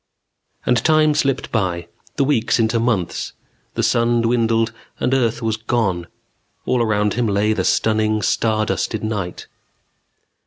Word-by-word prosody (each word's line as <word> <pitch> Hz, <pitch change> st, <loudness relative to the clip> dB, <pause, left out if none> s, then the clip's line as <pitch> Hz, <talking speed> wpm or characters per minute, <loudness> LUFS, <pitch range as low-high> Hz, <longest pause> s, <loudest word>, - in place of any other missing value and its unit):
And 125 Hz, -2 st, +2 dB
time 155 Hz, -1 st, +4 dB
slipped 135 Hz, -3 st, 0 dB
by, 90 Hz, -6 st, -1 dB, 0.3 s
the 140 Hz, -, +2 dB
weeks 130 Hz, -5 st, +2 dB
into 115 Hz, 0 st, +1 dB
months; 115 Hz, -7 st, -1 dB, 0.4 s
the -, -, 0 dB
sun 115 Hz, 0 st, +2 dB
dwindled 115 Hz, -1 st, +1 dB, 0.3 s
and 130 Hz, -, 0 dB
earth 120 Hz, -3 st, +1 dB
was 110 Hz, -1 st, 0 dB
gone. 110 Hz, -6 st, -1 dB, 0.6 s
All 125 Hz, -, +1 dB
around 105 Hz, -2 st, +1 dB
him 120 Hz, -1 st, 0 dB
lay 105 Hz, +1 st, +2 dB
the -, -, -1 dB
stunning 110 Hz, -1 st, +1 dB
star 110 Hz, 0 st, +1 dB
dusted 110 Hz, 0 st, -2 dB
night. 105 Hz, -5 st, -4 dB
115 Hz, 140 wpm, -20 LUFS, 105-120 Hz, 0.6 s, time